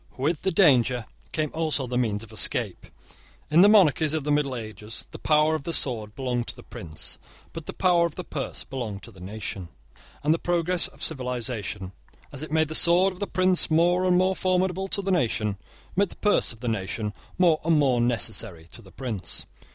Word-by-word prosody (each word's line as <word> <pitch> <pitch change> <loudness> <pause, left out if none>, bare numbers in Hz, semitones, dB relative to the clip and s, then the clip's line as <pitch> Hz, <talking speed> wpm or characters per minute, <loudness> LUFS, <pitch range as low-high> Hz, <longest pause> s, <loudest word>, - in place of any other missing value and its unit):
With 150 +4 -1
the 190 - 0
danger 130 - +3 0.3
came 155 -2 -2
also 155 -4 0
the 125 0 -5
means 110 -4 -1
of 115 - -13
escape. 105 -6 +1 0.6
In 165 +3 +6
the 200 - +7
monarchies 160 -7 +4
of 155 - -2
the 150 - -1
middle 145 -3 +1
ages 110 -1 -6
the - - -9
power 155 +1 +3
of 155 - -2
the 170 - -5
sword 110 -8 +2
belonged 125 -3 -2
to - - -3
the - - -13
prince; 80 -3 -6 0.3
but 165 -2 -8
the - - -3
power 175 -2 +2
of 160 - -12
the - - -6
purse 140 -3 -5
belonged 115 -8 -6
to - - -11
the 95 - -16
nation; 95 -2 -6 0.5
and 150 +2 +3
the 165 - -2
progress 175 0 +2
of - - -9
civilisation, 125 - -3 0.4
as 140 - -8
it 155 - -7
made 160 -1 +1
the - - -5
sword 180 +4 +6
of 180 - -15
the 205 - -3
prince 185 0 +2
more 175 +3 +3
and 180 -1 +3
more 185 +1 +2
formidable 185 +1 0
to 200 +1 -1
the 195 - -1
nation, 110 - 0 0.4
made 200 0 +2
the - - -12
purse 210 - +2
of 115 -1 -11
the 125 - -4
nation 105 0 -3 0.2
more 170 -4 +3
and 165 0 +3
more 130 -5 +2
necessary 110 -7 -2
to 120 - -7
the 95 -4 -17
prince. 105 -10 -4
145 Hz, 205 wpm, -25 LUFS, 115-170 Hz, 0.6 s, the